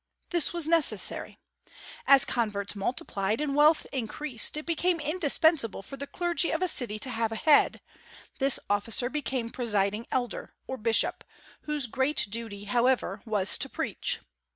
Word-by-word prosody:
This 345 -5 +3
was 340 -3 +2
necessary. 330 -1 +1 0.7
As 275 -1 +7
converts 210 -4 -2
multiplied 200 -1 -2
and 295 -2 -2
wealth 305 +2 +4
increased, 260 +2 -1
it 305 - -6
became 340 +1 0
indispensable 305 - +1
for 275 - -8
the 280 +1 -7
clergy 345 0 0
of 325 +3 -1
a - - +2
city 245 -10 +1
to 255 +4 -5
have 225 -1 -2
a - - -4
head; 295 +6 +3 0.6
this 275 -1 +3
officer 225 +5 +1
became 265 -6 -3
presiding 210 -3 -1
elder, 245 -2 -4
or 260 - -6
bishop, 225 0 +1 0.4
whose 300 -3 0
great 265 +4 0
duty, 220 -3 -5
however, 245 +5 0
was 205 -3 +3
to - - -3
preach. - - -3
260 Hz, 150 wpm, -27 LUFS, 225-300 Hz, 0.7 s, As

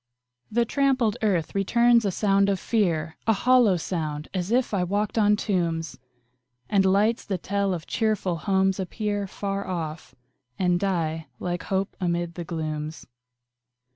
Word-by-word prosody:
The 235 +2 +2
trampled 260 -4 +1
earth 185 -7 0
returns 235 +4 +3
a 200 - +1
sound 200 +1 +2
of 195 -2 0
fear 170 -9 0
A 225 - +5
hollow 235 -2 +4
sound, 155 -3 -4
as 185 -1 -2
if 245 0 +1
I 190 -3 +1
walked 205 +3 -1
on 210 -2 +4
tombs! 170 - -2 0.7
And 195 -2 +3
lights, 210 +4 +2
that 190 -5 -3
tell 200 0 0
of 170 -2 -3
cheerful 215 -6 0
homes, 190 +2 +1
appear 205 +2 -2
Far 200 +1 -4
off, 165 -3 -5 0.4
and 180 -2 +2
die 165 -5 -1
like 175 -1 -3
hope 195 +1 -1
amid 170 -1 -1
the 175 - -5
glooms. 155 -2 -4
195 Hz, 145 wpm, -25 LUFS, 170-210 Hz, 0.7 s, A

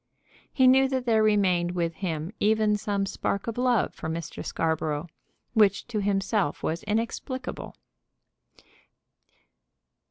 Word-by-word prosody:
He 260 - +3
knew 265 +1 +6
that 260 -2 -2
there 225 -2 +3
remained 185 -5 +2
with 170 -1 -1
him 165 -2 -4
even 215 0 +3
some 205 -1 -1
spark 200 0 -2
of 230 - -3
love 245 -3 +1
for - - -6
Mr. 165 -1 -5
Scarborough, 160 -1 -1 0.5
which 205 -4 +3
to 215 -3 -1
himself 195 -4 0
was 165 +2 -1
inexplicable. 235 +4 -3
205 Hz, 120 wpm, -26 LUFS, 175-225 Hz, 0.5 s, knew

